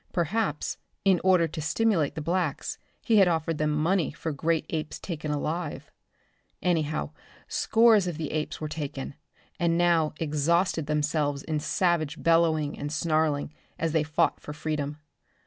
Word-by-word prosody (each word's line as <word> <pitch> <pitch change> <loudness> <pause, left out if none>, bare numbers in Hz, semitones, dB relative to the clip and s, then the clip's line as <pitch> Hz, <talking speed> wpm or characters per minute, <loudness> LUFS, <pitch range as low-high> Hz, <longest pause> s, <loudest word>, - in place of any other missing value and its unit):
Perhaps, 175 -2 -1 0.3
in 190 -3 +4
order 185 -3 +4
to 160 0 -6
stimulate 165 -2 +1
the 155 - -4
blacks, 170 -2 -1 0.2
he 225 - +3
had 195 -2 +7
offered 165 -2 0
them 150 0 +1
money 160 +2 +1
for 160 +1 -4
great 160 +2 0
apes 155 -1 -3
taken 155 -4 -5
alive. 155 +2 -3 0.7
Anyhow, 155 -4 0 0.4
scores 225 -4 +4
of 170 -4 -3
the 155 -2 -4
apes 155 -1 -3
were 155 - -3
taken, 145 -3 -5 0.5
and 170 -1 +2
now 170 -3 +3
exhausted 160 +1 +1
themselves 150 -2 0
in 155 -2 -1
savage 155 0 0
bellowing 160 -3 +2
and 145 +1 -4
snarling, 155 -2 0 0.2
as 165 -1 -1
they 160 0 +2
fought 150 0 +1
for 150 - -8
freedom. 150 -1 -3
160 Hz, 145 wpm, -27 LUFS, 150-170 Hz, 0.7 s, had